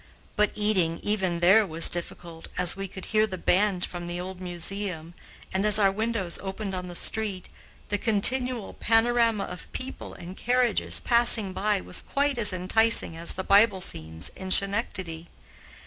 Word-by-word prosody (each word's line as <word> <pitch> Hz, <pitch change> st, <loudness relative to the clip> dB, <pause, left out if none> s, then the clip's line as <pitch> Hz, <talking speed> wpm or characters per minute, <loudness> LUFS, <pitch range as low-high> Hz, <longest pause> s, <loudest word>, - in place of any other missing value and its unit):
But 210 Hz, -1 st, +2 dB
eating, 190 Hz, -6 st, 0 dB
even 190 Hz, -5 st, -1 dB
there, 195 Hz, +6 st, +5 dB
was 165 Hz, -4 st, +6 dB
difficult, 170 Hz, -1 st, -4 dB
as 180 Hz, -1 st, +3 dB
we 195 Hz, 0 st, -5 dB
could 190 Hz, 0 st, -10 dB
hear 215 Hz, 0 st, +3 dB
the 190 Hz, -3 st, -6 dB
band 185 Hz, 0 st, +1 dB
from 175 Hz, -1 st, -8 dB
the 175 Hz, 0 st, -5 dB
old 185 Hz, 0 st, -8 dB
museum, 175 Hz, -1 st, -4 dB, 0.4 s
and, 190 Hz, +1 st, 0 dB
as 210 Hz, -1 st, +5 dB
our 200 Hz, -2 st, +3 dB
windows 210 Hz, -4 st, -2 dB
opened 195 Hz, +1 st, -5 dB
on 180 Hz, -1 st, -5 dB
the 175 Hz, -, -9 dB
street, 205 Hz, -1 st, -1 dB, 0.4 s
the 205 Hz, -, -1 dB
continual 245 Hz, +1 st, +1 dB
panorama 230 Hz, -1 st, +1 dB
of 180 Hz, -1 st, -9 dB
people 260 Hz, +1 st, -7 dB
and 180 Hz, +2 st, -10 dB
carriages 245 Hz, -2 st, 0 dB
passing 235 Hz, -5 st, +3 dB
by 205 Hz, 0 st, 0 dB
was -, -, -3 dB
quite 280 Hz, -2 st, -1 dB
as 210 Hz, -, +5 dB
enticing 185 Hz, +1 st, +3 dB
as 165 Hz, +1 st, -4 dB
the 190 Hz, -, -4 dB
Bible 200 Hz, 0 st, +4 dB
scenes 80 Hz, -, -2 dB
in 190 Hz, -1 st, -8 dB
Schenectady. 185 Hz, -5 st, -1 dB
195 Hz, 165 wpm, -26 LUFS, 180-220 Hz, 0.4 s, was